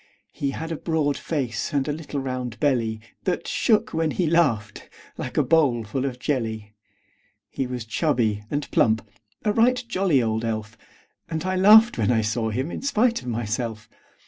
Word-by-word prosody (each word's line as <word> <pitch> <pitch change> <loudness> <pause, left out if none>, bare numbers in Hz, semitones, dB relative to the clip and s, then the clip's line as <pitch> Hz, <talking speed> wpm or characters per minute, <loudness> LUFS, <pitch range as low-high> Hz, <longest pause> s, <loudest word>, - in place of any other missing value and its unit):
He 140 - -2
had 160 +4 -5
a 165 - -2
broad 155 -4 0
face, 130 -8 -3
and 140 -1 0
a - - 0
little 150 -2 -5
round 130 -3 -4
belly 115 -7 +1 0.2
That 180 - -1
shook 220 -3 +1
when 165 -1 +1
he 175 +4 0
laughed, 140 -11 +1 0.3
like - - -6
a - - +4
bowl 140 -8 +3
full 130 +6 -3
of 130 -3 -3
jelly. 110 -6 -3 0.8
He 135 - -2
was 125 -2 -5
chubby 115 -5 0
and 145 0 -2
plump 110 -1 +2 0.4
a 210 - +2
right 245 +3 +3
jolly 190 - +2
old 110 -1 0
elf; 110 -1 -3 0.5
And 160 +1 -3
I 185 0 0
laughed 215 - +7
when 105 - +2
I 115 -2 +3
saw 110 +1 -1
him 130 +9 -2
in - - -5
spite 245 -3 +1
of - - -11
myself. 115 -1 -3
135 Hz, 175 wpm, -24 LUFS, 115-165 Hz, 0.8 s, laughed